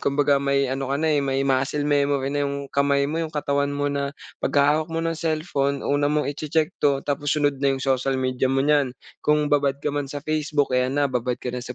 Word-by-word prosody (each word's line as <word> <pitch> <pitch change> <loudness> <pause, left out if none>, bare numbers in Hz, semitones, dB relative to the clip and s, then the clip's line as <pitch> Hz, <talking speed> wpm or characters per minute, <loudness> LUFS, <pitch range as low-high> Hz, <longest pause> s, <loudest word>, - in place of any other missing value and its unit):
Kumbaga, 140 0 +2
may 140 0 +1
ano 135 0 -3
ka 140 - 0
na, 155 +1 +1
eh, 145 - +2
may 135 0 0
muscle 135 +2 0
memory 140 -2 +1
na 145 0 0
yung 140 0 -6
kamay 140 0 +2
mo, 160 +3 -2
yung 160 -1 -3
katawan 140 -2 0
mo 145 0 -2
na 140 0 -2 0.3
pagkahawak 150 +3 +2
mo 165 - -2
ng 165 - 0
cellphone, 155 -4 -1
una 145 0 +1
mong 150 0 +1
iche-check 155 +3 -1
'to 140 -1 +2
tapos 145 0 -2
sunod 145 -2 +1
na 135 -1 +2
yung 130 - -6
social 135 0 +1
media 130 0 0
mo 135 +1 +1
niyan. 145 -3 +3 0.3
Kung 150 0 +1
babad 140 -2 +2
ka 150 - 0
man 145 -1 -2
sa 145 +1 -6
Facebook, 150 -2 0
ayan 125 +1 +1
na, 145 -2 +1
babad 125 0 -1
ka 125 - -5
na 125 - -4
sa 125 0 -7
140 Hz, 230 wpm, -23 LUFS, 135-145 Hz, 0.3 s, niyan